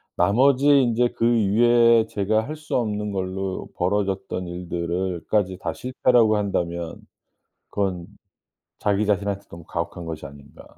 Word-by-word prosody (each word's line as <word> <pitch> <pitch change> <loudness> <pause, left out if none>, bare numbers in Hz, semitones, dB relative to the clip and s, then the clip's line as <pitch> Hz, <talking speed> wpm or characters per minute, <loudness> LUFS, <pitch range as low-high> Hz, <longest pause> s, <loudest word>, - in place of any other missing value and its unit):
나머지 130 +9 +3
인제 120 -2 +2
그 115 - +1
이외에 115 +2 +4
제가 110 +2 0
할 155 - -5
수 155 0 -5
없는 105 -3 -1
걸로 95 0 -3
벌어졌던 95 -1 -1
일들을 85 0 -3
까지 95 -3 0
다 - - -3
실패라고 125 -3 +2
한다면 85 -4 -3 0.7
그건 95 -4 -2 0.7
자기 105 0 +1
자신한테 100 -1 -1
너무 85 0 -11
가혹한 85 +1 -5
것이 80 -2 -6
아닌가. 70 0 -13
100 Hz, 290 characters per minute, -23 LUFS, 90-115 Hz, 0.7 s, 이외에